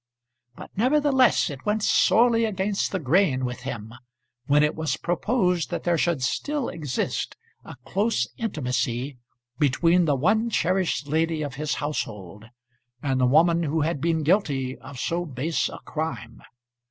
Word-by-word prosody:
But, - - -11
nevertheless, 260 - +3
it 140 -1 -9
went 210 0 0
sorely 230 +1 +4
against 200 -1 -1
the 190 - -1
grain 145 -4 +2
with 125 0 -4
him 115 -3 -6 0.5
when 145 +1 +4
it 150 - +2
was 160 -1 -2
proposed 180 -1 0
that - - -4
there 175 -1 +2
should 165 -5 0
still 290 - -1
exist 150 -6 -3 0.3
a - - -10
close 200 - 0
intimacy 130 - -2 0.4
between 165 +5 +3
the 145 -3 +2
one 215 - +2
cherished 180 - 0
lady 160 +1 0
of 145 -3 -5
his 150 +2 -2
household 105 - -5 0.6
and 135 -2 0
the 125 - +4
woman 165 +5 +4
who 160 0 0
had 150 -2 -1
been 165 -1 +1
guilty 140 -7 +1
of 130 - -10
so 170 +5 -1
base 150 +1 -2
a - - -8
crime. 120 -8 -5
160 Hz, 150 wpm, -25 LUFS, 130-190 Hz, 0.6 s, sorely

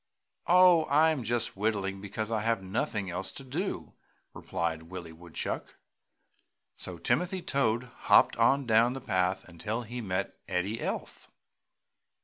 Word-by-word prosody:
"Oh, 180 -2 +6
I 155 +3 +4
am 145 -6 -2
just 115 +1 -1
whittling 100 -2 -1
because 105 +2 -4
I 110 -2 0
have 115 -2 0
nothing 95 0 -2
else 95 +2 -3
to 135 - -9
do!" 160 +10 -4 0.4
replied 80 -1 -3
Willie 90 -3 -7
Woodchuck. 85 +1 -5 1.0
So - - -7
Timothy 180 +1 0
Toad 120 -4 +1 0.3
hopped - - +6
on 135 +4 +3
down 115 +1 +4
the 135 - -5
path 95 -6 0
until 105 +7 -4
he 120 +2 -6
met 95 -2 -3
Eddie 100 +5 -1
Elf. - - -5
110 Hz, 135 wpm, -29 LUFS, 95-130 Hz, 1.0 s, Oh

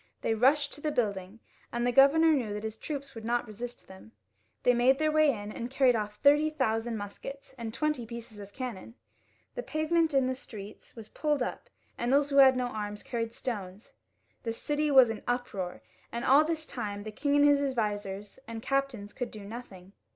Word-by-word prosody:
They 225 - +1
rushed 280 +6 +3
to 295 - -11
the 305 - 0
building, 205 -6 -2 0.3
and 240 0 -1
the 245 - +2
governor 280 +5 +6
knew 240 -9 0
that 210 - -5
his 220 0 -4
troops 280 +3 -6
would 225 -2 -9
not 240 +2 0
resist 235 +3 -8
them. 190 +4 -14 0.5
They 245 - +5
made 250 +3 +4
their 310 +1 +1
way 310 -1 +5
in, 210 -5 -3
and 235 +2 -5
carried 265 -1 +4
oflf 210 -2 -2
thirty 290 +7 +4
thousand 235 -6 -1
muskets 240 +8 -8
and 230 -3 -5
twenty 300 -2 -1
pieces 230 -2 -9
of 200 0 -10
cannon. 235 -3 -6 0.6
The - - -4
pavement 320 - +1
in 270 -1 +4
the 260 - 0
streets 215 -5 -11
was 220 -2 -10
pulled 295 -4 0
up; - - -6 0.3
those 275 +4 +2
who 280 - +1
had 265 -2 +8
no 250 - 0
arms 210 -3 -5
carried 230 -2 -3
stones; 205 -5 -6 0.5
the 230 -2 -3
city 295 +5 -1
was 260 -5 +7
ui 225 - -4
an - - -16
uproar, 200 - -3 0.3
and 235 +1 -3
all 280 +4 +6
this 315 0 -3
time 205 -7 -5
the 215 - -6
king 285 +6 0
and 290 0 +6
his 285 -1 +5
advisers 210 -6 -3
and 230 -1 -6
captains 270 -7 -1
could 245 -3 -4
do 215 - -10
nothing. 200 -4 -10
245 Hz, 200 wpm, -29 LUFS, 215-280 Hz, 0.6 s, had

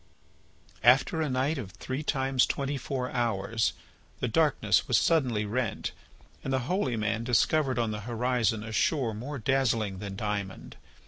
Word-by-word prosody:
After 130 +7 +4
a 155 - 0
night 135 +4 0
of 100 -6 -7
three 130 +6 -4
times 135 -3 +1
twenty 140 +1 -2
four 130 -1 -3
hours 110 -5 0 0.5
the - - 0
darkness - - +2
was - - +4
suddenly 125 -10 +2
rent 110 0 -2 0.5
and 135 - -3
the 130 -1 +1
holy 145 - 0
man 110 +1 -1
discovered 130 +3 +2
on 115 -2 0
the 105 - -4
horizon 120 -1 0
a 110 - -7
shore 120 +1 +1
more 130 +7 -5
dazzling 115 -6 +1
than 100 -1 -6
diamond. 100 -2 -4
120 Hz, 150 wpm, -28 LUFS, 110-135 Hz, 0.5 s, After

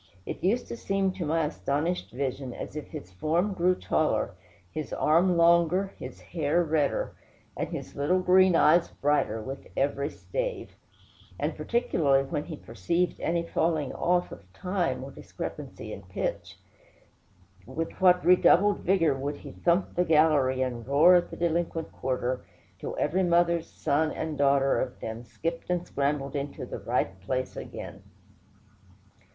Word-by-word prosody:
It - - -6
used 220 +7 +2
to - - -4
seem 195 -3 0
to 185 -4 -4
my 160 +1 +1
astonished 150 +4 -2
vision 130 0 -4
as - - -7
if 150 - -5
his 90 - -9
form 165 - 0
grew 180 0 +2
taller, - - 0 0.4
his 155 - -5
arm 175 +3 +3
longer, 170 +3 +4
his - - -8
hair 165 +1 0
redder, 155 -3 0 0.4
and - - -3
his - - -7
little 150 +7 +2
green 185 0 +5
eyes 170 +2 +5
brighter, 140 -7 0
with 135 +4 -7
every 140 +1 0
stave; - - -4 0.7
and - - -1
particularly 155 - +1
when 150 +1 -3
he 160 - -6
perceived 165 - -1
any 170 0 0
falling 160 -4 0
off 180 0 +1
of 95 -2 -12
time 180 - -2
or - - -8
discrepancy - - -7
in - - -8
pitch; - - -4 1.1
with 165 0 -3
what 180 -1 +5
redoubled 185 +3 +5
vigor 170 -5 +2
would 140 +2 -3
he - - -10
thump 175 +2 +1
the 180 - +2
gallery 150 -5 +3
and 120 -2 -4
roar 145 +6 +6
at 175 -1 +3
the - - -8
delinquent 170 -1 -1
quarter, 125 -1 -2 0.4
till - - -5
every 185 +3 +1
mother's 170 -1 +2
son 155 +2 0
and 155 -3 -4
daughter 140 -1 +3
of 130 -1 -4
them 110 +1 -6
skipped 165 +9 -5
and 175 -1 0
scrambled 140 -2 -1
into 140 0 -4
the - - -6
right 95 -1 -1
place 130 +6 -3
again! - - -8
160 Hz, 150 wpm, -28 LUFS, 140-180 Hz, 1.1 s, roar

